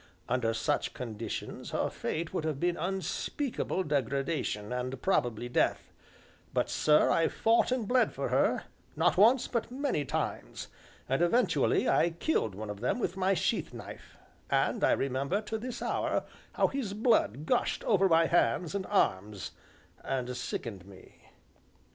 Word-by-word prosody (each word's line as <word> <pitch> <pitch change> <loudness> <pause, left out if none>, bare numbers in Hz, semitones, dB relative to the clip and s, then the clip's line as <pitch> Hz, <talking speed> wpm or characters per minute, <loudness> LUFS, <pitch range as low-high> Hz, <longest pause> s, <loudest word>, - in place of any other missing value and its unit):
Under 120 -2 +1
such 110 - -1
conditions 115 -2 -5
her - - 0
fate 165 +2 -3
would 175 - -1
have 155 -3 -2
been 175 +1 +1
unspeakable 190 - -2
degradation, 140 - -1
and 125 +1 -3
probably 120 - 0
death; 120 - 0 0.6
but, - - +1
sir, 150 0 +4
I 165 - +3
fought 230 +2 +2
and 250 -5 0
bled 250 +2 +3
for - - -3
her, - - +2 0.3
not - - +3
once 230 +6 +5
but 235 -2 -2
many 260 - -1
times, 135 - -4 0.4
and 135 +4 0
eventually 230 +9 +2
I 170 - +4
killed 165 - -1
one 105 +1 -5
of 105 - -8
them 125 - 0
with 205 -6 -2
my 190 +1 +2
sheath - - -1
knife, - - -10 0.3
and - - +1
I - - +5
remember, 140 +8 0
to 220 +1 -4
this 245 +2 -5
hour, - - 0 0.3
how - - +2
his 240 -8 -3
blood 210 - +2
gushed 250 - 0
over 195 -3 +3
my 165 0 +5
hands 160 0 +2
and 200 -2 -3
arms, 100 - 0 0.5
and 125 -2 -2
sickened 115 -6 -5
me. 95 -2 -16
160 Hz, 150 wpm, -30 LUFS, 125-200 Hz, 0.6 s, once